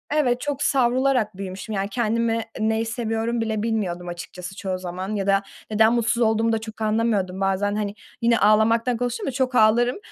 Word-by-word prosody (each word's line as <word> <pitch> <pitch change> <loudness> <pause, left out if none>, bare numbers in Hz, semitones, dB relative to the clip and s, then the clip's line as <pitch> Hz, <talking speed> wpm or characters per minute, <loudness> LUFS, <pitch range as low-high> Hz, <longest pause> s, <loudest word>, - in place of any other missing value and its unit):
Evet, 250 -5 +2
çok 290 -1 -2
savrularak 250 -5 +2
büyümüşüm. 195 +3 -6
Yani, 195 +1 -1
kendimi 230 0 0 0.2
neyi 220 +1 +1
seviyorum 230 0 -2
bile 220 -1 -1
bilmiyordum 190 -6 -2
açıkçası 175 +2 -7
çoğu 190 -2 -3
zaman 185 +3 -5
ya 195 -1 -2
da 195 0 +3 0.3
neden 220 +2 +4
mutsuz 235 0 +1
olduğumu 225 +1 +2
da 225 - +2
çok 220 0 -9
anlamıyordum. 215 -4 0
Bazen 195 +1 +1
hani, 210 -1 -2 0.3
yine 235 0 +3
ağlamaktan 225 +3 +3
konuştum 245 0 -3
da - - 0
çok 255 0 -1
ağlarım. 240 +2 +4
220 Hz, 170 wpm, -23 LUFS, 200-235 Hz, 0.3 s, neden